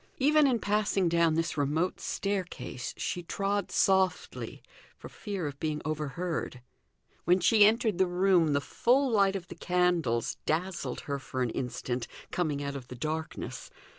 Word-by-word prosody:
Even 300 Hz, +2 st, +5 dB
in 250 Hz, -3 st, +2 dB
passing 205 Hz, -3 st, +1 dB
down 170 Hz, -1 st, +3 dB
this 165 Hz, 0 st, -1 dB
remote 150 Hz, +5 st, 0 dB
staircase, 180 Hz, -11 st, -3 dB
she 175 Hz, -, -2 dB
trod 200 Hz, +3 st, -1 dB
softly 190 Hz, -1 st, +1 dB, 0.3 s
for -, -, -10 dB
fear 200 Hz, -5 st, -5 dB
of 140 Hz, -1 st, -5 dB
being 155 Hz, -1 st, -1 dB
overheard. 155 Hz, -3 st, -3 dB, 0.6 s
When 180 Hz, +2 st, +4 dB
she 205 Hz, +4 st, +6 dB
entered 220 Hz, -3 st, +2 dB
the 190 Hz, -, +4 dB
room, 180 Hz, -3 st, +3 dB
the 140 Hz, -, +2 dB
full 260 Hz, -, +2 dB
light 200 Hz, -3 st, +3 dB
of 180 Hz, -3 st, -5 dB
the -, -, -8 dB
candles 175 Hz, -9 st, +1 dB
dazzled 170 Hz, -5 st, -1 dB
her 140 Hz, -1 st, -3 dB
for 130 Hz, -1 st, -3 dB
an 120 Hz, -, -1 dB
instant, 125 Hz, -1 st, -3 dB, 0.2 s
coming 150 Hz, -5 st, -1 dB
out 140 Hz, 0 st, -4 dB
of 130 Hz, -3 st, -7 dB
the 125 Hz, -, -8 dB
darkness. 155 Hz, +5 st, -4 dB
175 Hz, 155 wpm, -29 LUFS, 145-195 Hz, 0.6 s, she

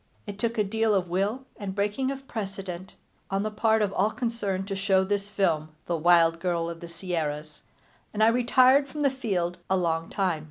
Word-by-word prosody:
It 205 Hz, -1 st, -7 dB
took 235 Hz, +1 st, -1 dB
a 210 Hz, -, +3 dB
deal 220 Hz, +1 st, +1 dB
of 180 Hz, -2 st, 0 dB
will 205 Hz, +8 st, 0 dB
and 195 Hz, -2 st, -5 dB
breaking 210 Hz, +6 st, 0 dB
of 270 Hz, 0 st, -6 dB
precedent, 195 Hz, -4 st, -6 dB, 0.3 s
on 195 Hz, +1 st, 0 dB
the 215 Hz, -, -2 dB
part 220 Hz, 0 st, +2 dB
of 200 Hz, -1 st, -1 dB
all 200 Hz, +3 st, +2 dB
concerned, 205 Hz, -5 st, -2 dB
to 195 Hz, -, -2 dB
show 195 Hz, -1 st, +2 dB
this 200 Hz, +1 st, -1 dB
film, 165 Hz, -7 st, 0 dB, 0.2 s
The 175 Hz, -, -1 dB
Wild 165 Hz, 0 st, +4 dB
Girl 170 Hz, -1 st, -1 dB
of 165 Hz, -, -9 dB
the 170 Hz, -, -8 dB
Sierras, 155 Hz, -4 st, -4 dB, 0.5 s
and 215 Hz, 0 st, +1 dB
I 220 Hz, -, +7 dB
retired 255 Hz, +3 st, +4 dB
from 295 Hz, +2 st, -4 dB
the 280 Hz, -, +4 dB
field 185 Hz, -9 st, -2 dB
a 190 Hz, -, +3 dB
long 165 Hz, -2 st, -1 dB
time. 185 Hz, -5 st, 0 dB
195 Hz, 200 wpm, -27 LUFS, 175-220 Hz, 0.5 s, I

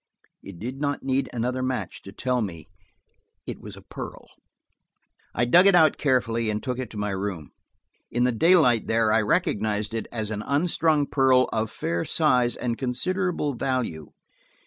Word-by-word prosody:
It 95 Hz, -3 st, -11 dB
did 125 Hz, +8 st, -6 dB
not 145 Hz, -1 st, -1 dB
need 135 Hz, 0 st, 0 dB
another 125 Hz, +2 st, -2 dB
match 130 Hz, 0 st, -3 dB
to 100 Hz, -, -11 dB
tell 125 Hz, +3 st, -1 dB
me 85 Hz, -6 st, -5 dB, 0.8 s
it -, -, -6 dB
was -, -, -9 dB
a -, -, -13 dB
pearl. -, -, -9 dB, 1.1 s
I 120 Hz, -, +2 dB
dug 175 Hz, +10 st, +6 dB
it 195 Hz, -, +6 dB
out 160 Hz, -4 st, +5 dB
carefully 115 Hz, -5 st, +1 dB
and 105 Hz, 0 st, -2 dB
took 125 Hz, -2 st, -3 dB
it 125 Hz, -4 st, -4 dB
to 110 Hz, -, -10 dB
my 105 Hz, 0 st, -2 dB
room. 95 Hz, -5 st, -4 dB, 0.6 s
In 120 Hz, -, 0 dB
the 125 Hz, -, +3 dB
daylight 125 Hz, -, +4 dB
there 110 Hz, -1 st, +2 dB
I 115 Hz, -, +4 dB
recognized 105 Hz, 0 st, 0 dB
it 115 Hz, -, -3 dB
as 110 Hz, -2 st, -4 dB
an 105 Hz, -1 st, -3 dB
unstrung 155 Hz, +2 st, +1 dB
pearl 130 Hz, -2 st, +3 dB
of 110 Hz, -1 st, -1 dB
fair 85 Hz, -3 st, -2 dB
size 125 Hz, -7 st, +2 dB
and 120 Hz, -2 st, -3 dB
considerable 160 Hz, +4 st, -1 dB
value. 125 Hz, -, -2 dB
125 Hz, 170 wpm, -25 LUFS, 110-135 Hz, 1.1 s, dug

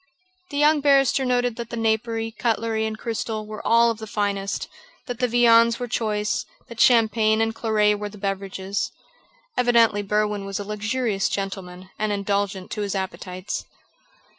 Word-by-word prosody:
The 285 Hz, -, -5 dB
young 295 Hz, +1 st, +4 dB
barrister 275 Hz, -2 st, +4 dB
noted 245 Hz, -2 st, +1 dB
that 235 Hz, -1 st, -6 dB
the 235 Hz, -, -5 dB
napery, 225 Hz, 0 st, 0 dB
cutlery, 225 Hz, -1 st, -1 dB
and 220 Hz, 0 st, -5 dB
crystal 225 Hz, -1 st, -3 dB
were 215 Hz, 0 st, -7 dB
all 230 Hz, 0 st, +4 dB
of 225 Hz, -, -6 dB
the 220 Hz, -, -7 dB
finest; 200 Hz, -1 st, -2 dB, 0.4 s
that 245 Hz, -3 st, -5 dB
the 250 Hz, -, +2 dB
viands 230 Hz, -1 st, +5 dB
were 245 Hz, -, -3 dB
choice; 210 Hz, -3 st, -1 dB, 0.3 s
that 235 Hz, -1 st, -10 dB
champagne 220 Hz, -2 st, +4 dB
and 225 Hz, 0 st, +1 dB
claret 215 Hz, -2 st, +2 dB
were 210 Hz, 0 st, -4 dB
the 210 Hz, -, -13 dB
beverages. 195 Hz, 0 st, -3 dB, 0.7 s
Evidently 230 Hz, -4 st, +4 dB
Berwin 210 Hz, 0 st, 0 dB
was 195 Hz, 0 st, -4 dB
a -, -, -3 dB
luxurious 210 Hz, 0 st, -1 dB
gentleman 185 Hz, -2 st, -5 dB
and 215 Hz, 0 st, 0 dB
indulgent 200 Hz, -1 st, -2 dB
to 210 Hz, -, -3 dB
his 200 Hz, -1 st, -2 dB
appetites. 185 Hz, -1 st, -4 dB
220 Hz, 160 wpm, -23 LUFS, 205-235 Hz, 0.7 s, viands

